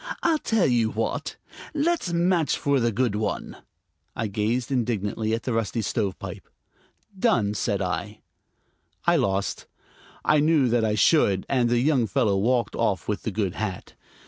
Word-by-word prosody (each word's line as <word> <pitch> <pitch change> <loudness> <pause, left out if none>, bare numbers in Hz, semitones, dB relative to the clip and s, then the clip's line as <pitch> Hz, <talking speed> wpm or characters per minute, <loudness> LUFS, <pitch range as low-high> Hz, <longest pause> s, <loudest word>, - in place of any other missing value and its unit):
"I'll 325 -2 +3
tell 225 -8 +1
you 120 -3 +2
what; 110 +1 -3 0.4
let's 310 - 0
match 170 -2 +2
for 140 -1 +1
the 120 -1 +1
good 120 0 0
one." 105 0 -3 0.6
I 115 - -2
gazed 110 +5 -1
indignantly 110 -3 -1
at 115 - -6
the 125 - -2
rusty 115 0 -1
stovepipe. 100 -1 -4 0.7
"Done!" 150 - +2
said 100 -1 -1
I. 100 +3 -4 0.8
I 170 0 +4
lost; 100 -7 -1 0.6
I 155 - +4
knew 150 -4 +3
that 115 -1 +2
I 105 -1 +1
should; 105 - +3
and 125 -3 +2
the 120 - +2
young 130 -4 +2
fellow 100 +1 +1
walked 120 +5 +1
off 100 -7 0
with 105 -1 -2
the 110 - -3
good 100 -3 -1
hat. 105 -4 -5
115 Hz, 155 wpm, -25 LUFS, 105-140 Hz, 0.8 s, I